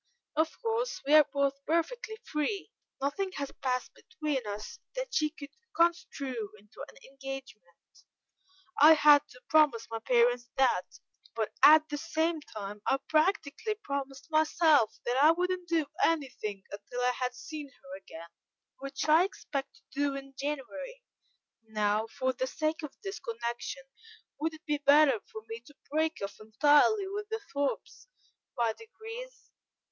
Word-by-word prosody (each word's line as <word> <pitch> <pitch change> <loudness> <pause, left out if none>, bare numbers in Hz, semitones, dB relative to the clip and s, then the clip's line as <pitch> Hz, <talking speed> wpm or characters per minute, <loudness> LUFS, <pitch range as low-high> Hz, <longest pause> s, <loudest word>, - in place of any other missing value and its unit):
Of 315 +1 0
course, 460 +2 -1
we 290 - +2
are 305 -2 +8
both 280 -1 0
perfectly 430 +8 -1
free; 370 +8 -2 0.3
nothing 365 +8 -2
has 280 -3 -4
passed 255 -2 -1
between 295 -7 -4
us 210 +1 -6 0.2
that - - -4
she 305 -8 +2
could 290 -2 -11 0.2
construe 275 -9 0
into 210 +1 -12
an - - -16
engagement; 270 -9 -10 0.8
I 310 +2 +10
had 295 -2 +7
to - - -16
promise 300 -8 +4
my 225 - -3
parents 240 +1 +2
that: 255 -9 +1 0.4
but 220 -2 -1
at 310 +1 +8
the 295 -1 -3
same 320 +1 0
time 210 -5 -8
I 270 - +3
practically 315 +4 +1
promised 280 -6 -5
myself 310 -5 +4
that 245 +1 0
I 290 +3 +7
wouldn't 360 +1 0
do 330 -3 +2 0.2
anything 255 -11 -1
until 205 +5 -6
I 250 0 +3
had 250 0 -3
seen 295 +3 -7
her 275 0 -12
again, 170 - -11 0.5
which 275 +2 -4
I 315 +3 +6
expect 285 -7 -4
to - - -22
do 285 0 0
in 275 0 -8
January. 300 - -5 0.6
Now, 215 0 0
for 260 +3 -1
the 260 +1 -2
sake 310 +3 -2
of 300 -3 -7
this 390 +1 -5
connection, 235 +3 -4 0.6
would 320 +1 -1
it 310 - -17
be 295 -1 0
better 285 -3 +5
for 220 - -8
me 225 0 -6
to 290 - -16 0.2
break 315 +1 +1
off 200 - -6
entirely 295 - +4
with 410 +2 -5
the 445 0 -2
Thorpes 285 - -3 0.5
by 230 -2 +2
degrees? 455 - -10
285 Hz, 150 wpm, -30 LUFS, 250-320 Hz, 0.8 s, I